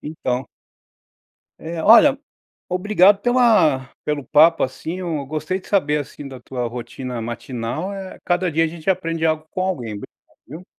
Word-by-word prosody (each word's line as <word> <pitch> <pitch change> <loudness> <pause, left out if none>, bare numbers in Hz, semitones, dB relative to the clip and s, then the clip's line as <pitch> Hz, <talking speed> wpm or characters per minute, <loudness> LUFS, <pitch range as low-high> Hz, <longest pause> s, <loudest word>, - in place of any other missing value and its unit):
Então 130 -4 -3 1.1
É. 165 0 -5
Olha, 260 - +6 0.5
obrigado 195 +1 +3
pela 215 - +3
pelo 150 -2 -2
papo, 165 +2 +5
assim, 160 +7 -4
eu 165 -6 -3
gostei 155 +6 -3
de - - -17
saber, 150 -7 +1
assim, 145 0 -10
da 130 -2 -10
tua 125 0 -4
rotina 125 +1 -6
matinal, 120 - -4
eh, 190 -1 -8
cada 175 -1 +1
dia 165 +2 +2
a - - -1
gente 165 +2 -5
aprende 165 -3 -1
algo 155 -1 0
com 185 - -3
alguém, 145 - -2
obrigado 100 - -12
viu. 160 +8 -10
160 Hz, 155 wpm, -21 LUFS, 130-185 Hz, 1.1 s, Olha